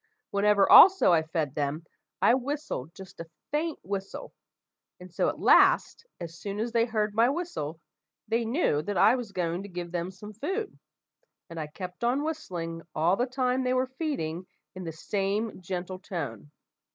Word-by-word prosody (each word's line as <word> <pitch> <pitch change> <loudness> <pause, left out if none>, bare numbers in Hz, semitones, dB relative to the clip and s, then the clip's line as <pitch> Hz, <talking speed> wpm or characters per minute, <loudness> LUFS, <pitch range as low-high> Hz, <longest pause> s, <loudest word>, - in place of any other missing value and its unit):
Whenever 200 0 +3
also 380 - +8
I 165 - +4
fed 160 -3 -3
them, 145 +2 -2 0.4
I - - +6
whistled 260 - -3
just 190 -1 -12
a 165 -1 -8 0.2
faint 310 +2 -1
whistle, 195 0 -5
like - - -12
this. - - -40 0.7
And 180 -1 -13
so, - - +1
at - - -6
last, - - +4
as 170 -1 -8
soon 200 0 -5
as 230 +2 -2
they 230 0 +3
heard 215 -3 -1
my 230 +3 +4
whistle, 265 - -4 0.5
they 230 +2 +1
knew 230 - +1
that 200 +5 -3
I 230 - +6
was 240 -5 -5
going 175 -1 -2
to 200 - -9
give 175 -1 -6
them 175 0 -2
some 210 +3 -11
food, 385 - -4 0.8
and 165 - -6
I 155 - -4
kept 180 +6 -8
on 255 +5 +1
whistling 175 - -4
all 170 +4 +3
the 245 +5 0
time 255 0 0
they 255 0 +1
were 255 0 0
feeding 185 - -3 0.3
in 185 -1 -8
the 165 - -4
same 200 +5 -2
gentle 185 0 -5
tone. 145 - -6
195 Hz, 180 wpm, -28 LUFS, 170-245 Hz, 0.8 s, also